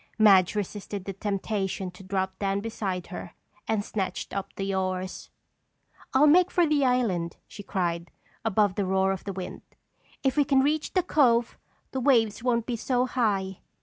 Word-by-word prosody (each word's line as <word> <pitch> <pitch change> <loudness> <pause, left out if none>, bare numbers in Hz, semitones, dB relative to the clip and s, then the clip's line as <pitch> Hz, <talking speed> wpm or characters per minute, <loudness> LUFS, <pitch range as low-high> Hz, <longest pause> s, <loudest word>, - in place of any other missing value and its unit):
Madge 195 -4 +6
resisted 205 -1 -4
the 195 - -4
temptation 195 -1 -2
to 180 - -14
drop 190 0 -2
down 195 -1 0
beside 200 -4 -3
her - - -7 0.3
and 215 -2 0
snatched 190 -3 -3
up 195 0 -4
the 195 0 -2
oars. 185 0 -3 0.8
"I'll 265 +3 +5
make 355 +4 +6
for 350 -2 +3
the 300 -2 +2
island!" 220 -10 +1
she 205 - -10
cried, 175 -3 -2 0.3
above 210 -3 +2
the 200 +1 -1
roar 190 0 +2
of 190 - -4
the 200 - -3
wind. 185 -1 -6 0.6
"If 270 +1 +1
we 290 - +6
can 270 -1 +3
reach 300 +2 0
the 370 - +2
cove, 245 -8 +3 0.4
the 265 - -2
waves 230 -6 +3
won't 235 -2 +1
be 240 -1 -2
so 250 +2 +1
high." 200 -7 0
205 Hz, 170 wpm, -27 LUFS, 190-250 Hz, 0.8 s, Madge